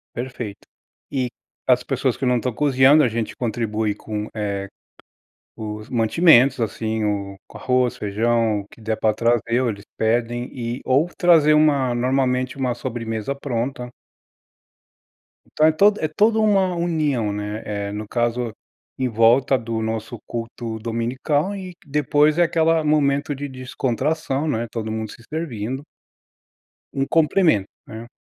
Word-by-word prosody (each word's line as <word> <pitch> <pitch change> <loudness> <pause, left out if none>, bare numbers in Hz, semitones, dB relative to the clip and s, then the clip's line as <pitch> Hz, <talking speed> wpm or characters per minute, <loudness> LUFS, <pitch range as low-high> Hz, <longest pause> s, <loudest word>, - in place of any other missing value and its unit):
Perfeito. 120 -4 -5 0.5
E, 130 -3 -1 0.4
as - - +4
pessoas - - 0
que 135 - -2
não 125 -1 +3
estão 125 0 -2
cozinhando 140 +2 +5
a - - +4
gente 115 0 -3
contribui 110 -3 -1
com, 105 0 -5
eh, 100 -2 -3 0.9
os 105 0 -6
mantimentos, 130 +2 +4
assim, 110 -1 -2
o 100 -1 -2
com - - -11
arroz, 125 -1 +1
feijão 110 +1 +1
o 100 - -16
que 115 - -18
der 110 0 -1
pra 110 -1 +2
trazer, 115 +2 +1
ou 125 - +1
eles 100 -2 -6
pedem, 120 +2 0
e 120 -1 -4
ou 140 +6 +3
trazer 165 -5 +5
uma 140 -5 +3
normalmente 130 +1 0
uma 125 -2 0
sobremesa 115 0 -4
pronta. 125 -2 -3 1.6
Então 155 - +3
é 160 - +6
todo 205 +6 +4
é 155 - +1
toda 215 +8 +2
uma 195 -4 +3
união, 150 -10 0
né, 105 +1 -4
eh, 100 -1 -3
no 105 +1 -5
caso, 120 0 -1 0.4
em 130 -1 0
volta 120 +4 +4
do 115 -1 -3
nosso 110 +1 -4
culto 115 -1 -5
dominical 130 - -1
e 185 -2 -7
depois 150 +2 +2
é 175 - +5
aquela 165 -1 +2
momento 145 -1 +1
de 145 +1 -5
descontração, 135 +3 -2
né, 120 -5 -1
todo 110 -2 -4
mundo 110 -1 -4
se 115 - -14
servindo. 135 -5 -4 1.1
Um 135 0 0
complemento, 160 - +3 0.2
né. 110 +2 -8
125 Hz, 145 wpm, -22 LUFS, 110-145 Hz, 1.6 s, é